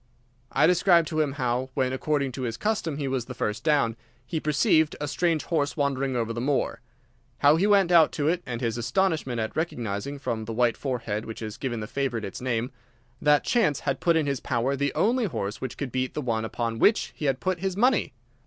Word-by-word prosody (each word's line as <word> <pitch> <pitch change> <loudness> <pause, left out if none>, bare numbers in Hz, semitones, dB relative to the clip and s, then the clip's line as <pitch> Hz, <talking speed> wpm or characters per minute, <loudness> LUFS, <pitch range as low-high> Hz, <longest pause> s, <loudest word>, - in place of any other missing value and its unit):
I 150 - +4
described 175 -1 +4
to 155 -1 0
him 145 -3 0
how, 130 -1 -1
when 130 -2 +1
according 140 0 0
to 130 - -6
his 115 -3 -3
custom 185 - -1
he 145 -2 -2
was 130 -3 -1
the 125 - -8
first 105 0 -2
down, 140 -8 +2 0.3
he 160 - -2
perceived 155 +1 +2
a 150 - -3
strange 165 +1 0
horse 150 -4 -1
wandering 135 -2 0
over 115 -1 -1
the 120 - -4
moor. 140 +2 0 0.6
How 145 +3 +5
he 185 +5 +2
went 195 -4 +4
out 165 -3 +6
to 145 - -1
it, 175 +2 +1
and 120 -2 -5
his 115 -1 -1
astonishment 130 -1 0
at 110 0 -3
recognising, 125 -5 -3
from 115 -5 -3
the 115 - -5
white 120 0 +2
forehead 115 -5 -3
which 110 - -7
has 110 -1 -5
given 120 -4 -3
the - - -3
favourite 125 -2 -2
its 95 - -7
name, 125 0 -1 0.5
that 150 0 +4
chance 225 - +1
had 135 -2 -1
put 170 -2 +3
in 160 -2 +2
his 140 -2 -1
power 130 +2 0
the 140 +1 0
only 240 +2 +2
horse 105 - -4
which 130 - -5
could 140 -4 -4
beat 130 0 -2
the 150 - -1
one 110 -3 -1
upon 115 0 -3
which 215 - +3
he 150 - -5
had 135 -2 +1
put 185 -2 -1
his 190 0 -2
money. 245 0 +3
135 Hz, 220 wpm, -26 LUFS, 120-160 Hz, 0.6 s, out